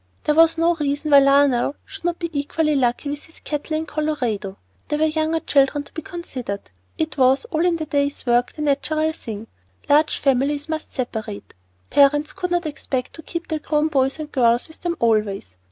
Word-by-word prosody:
There 300 - +2
was 330 +1 +5
no 335 +1 +3
reason 295 -1 -2
why 280 - +9
Lionel 275 -1 +3
should 390 -3 -10
not 345 -1 0
be 335 -2 -4
equally 300 +1 0
lucky 250 +1 +1
with 290 0 -6
his 320 - -18
cattle 305 +1 -3
in 320 - -3
Colorado; 250 -11 -2 0.3
there 295 - -1
were 310 - +3
younger 315 +1 0
children 280 +1 +2
to - - -19
be 320 - -5
considered; 255 - -6 0.3
it 315 -2 -2
was 260 - +4
"all 320 -1 +1
in 350 -1 +3
the 320 -1 -3
day's 285 -1 -1
work," 245 0 +2
the 300 - -5
natural 310 +2 +1
thing. 225 -8 -7 0.4
Large 300 +2 +4
families 280 +2 +1
must 315 -1 -4
separate, 220 -5 -5 0.4
parents 290 +2 +4
could 370 -2 -3
not 350 -1 0
expect 270 -4 -3
to 320 - -9
keep 335 +2 -6
their 315 -1 -2
grown 300 0 0
boys 270 -2 +1
and 305 -1 -6
girls 240 -2 +2
with 320 - -12
them 345 -1 -1
always. 210 - 0
295 Hz, 195 wpm, -22 LUFS, 260-315 Hz, 0.4 s, why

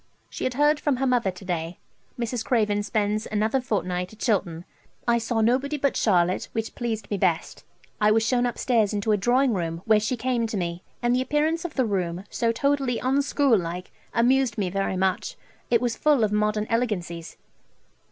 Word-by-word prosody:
She - - -4
had 255 - -1
heard 295 +2 +3
from 290 -3 +1
her 265 +2 -1
mother 245 -6 +2
to 185 +1 -9
day. 170 -1 -3 0.4
Mrs. 235 -1 -2
Craven 210 -4 +1
spends 210 +1 -1
another 220 +5 +1
fortnight 180 -6 -2
at 220 - -14
Chilton. 180 -7 -1 0.4
I 235 0 +3
saw 230 0 -1
nobody 265 +6 +1
but 280 0 0
Charlotte, 180 -3 +2
which 225 0 -3
pleased 225 -3 -4
me 205 - 0
best. 175 -3 0 0.4
I 210 - +5
was 220 +1 +3
shewn 245 +1 +2
upstairs 230 -3 +1
into 205 +2 0
a 210 - +3
drawing 245 +5 +2
room, 165 -2 -3
where 215 -1 +5
she 230 +4 -1
came 240 -1 0
to 220 - -3
me, 170 -1 -3 0.2
and 240 +1 +3
the 255 - +2
appearance 305 +5 0
of 350 - -5
the 260 - +2
room, 185 -4 -2
so 230 -1 +1
totally 270 0 0
unschool 275 -3 +2
like, 175 +2 -6 0.2
amused 245 0 +2
me 190 -4 -1
very 195 -1 -1
much; 190 0 -1 0.3
it 235 -1 +3
was 240 -2 0
full 295 -6 +3
of 210 - +1
modern 210 0 +1
elegancies. 180 -8 -2
225 Hz, 190 wpm, -25 LUFS, 195-250 Hz, 0.4 s, I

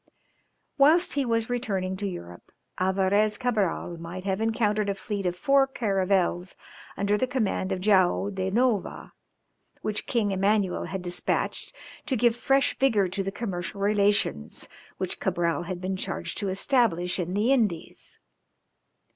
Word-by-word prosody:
Whilst 320 +6 +5
he 280 -2 0
was 230 -1 0
returning 200 -7 -2
to 200 +1 -2
Europe 90 - -8 0.3
Alvarès 195 +3 +2
Cabral 210 -8 -1
might 175 +2 -7
have 195 +1 -1
encountered 215 -2 +1
a 200 - 0
fleet 200 -1 -3
of 175 - -1
four 275 +8 +3
caravels 195 -6 0 0.4
under 205 +1 +1
the 255 - +1
command 220 -6 -1
of 190 -1 -2
Joao 195 0 +3
da 190 -1 -2
Nova, 225 -1 0 0.7
which 210 -1 -2
King 215 -4 +1
Emmanuel 195 0 +1
had 190 -1 -5
despatched 175 0 -2 0.3
to 265 - +1
give 235 0 +3
fresh 270 +3 +2
vigour 215 -8 +3
to 195 +2 -2
the 195 0 -3
commercial 195 -3 -4
relations 200 - +1 0.3
which - - -3
Cabral 170 0 0
had 180 0 -4
been 190 +1 -3
charged - - -3
to 200 -3 -2
establish 190 -4 +1
in 180 +1 -2
the 215 +6 +2
Indies. 215 -11 -1
200 Hz, 145 wpm, -26 LUFS, 185-225 Hz, 0.7 s, Whilst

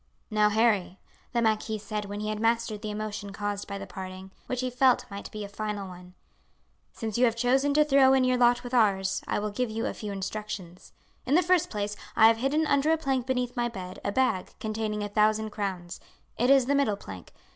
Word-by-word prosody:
"Now, 210 -1 +4
Harry," 210 -4 +1 0.3
the 235 -1 +1
marquis 220 0 0
said 210 0 -4
when 205 +1 -5
he 215 - -2
had 215 0 -3
mastered 225 -1 0
the 215 - -4
emotion 210 -1 -5
caused 205 0 -4
by 200 - -5
the 195 - -7
parting, 185 0 -8 0.2
which 255 0 -2
he 255 0 -2
felt 255 0 +3
might 200 0 -7
be 210 -1 -6
a - - -5
final 205 -1 -4
one, 180 0 -12 0.8
"since 220 0 -4
you 250 - +6
have 230 -2 +1
chosen 260 +4 +2
to 300 0 +5
throw 270 -2 +5
in 265 -1 +4
your 255 0 +3
lot 240 0 +4
with 245 0 -8
ours, 195 -5 +2
I - - 0
will 210 0 -2
give 245 +3 -1
you 225 +1 -3
a - - -2
few 210 -2 -6
instructions. 195 -2 -6 0.4
In 275 - +3
the 360 - +5
first 360 -1 +2
place, 210 -1 -3 0.2
I 220 - +6
have 225 - +2
hidden 280 +6 +1
under 285 0 +2
a 320 - +3
plank 265 -5 -1
beneath 250 -1 -1
my 240 -1 0
bed 185 -5 -8
a 200 - -1
bag 225 -5 0
containing 215 -1 -3
a - - -2
thousand 215 +1 +1
crowns. 190 -4 -4 0.4
It 245 +2 +1
is 270 -2 +6
the 280 - +1
middle 275 -8 +2
plank. 95 - -10
215 Hz, 220 wpm, -27 LUFS, 205-250 Hz, 0.8 s, you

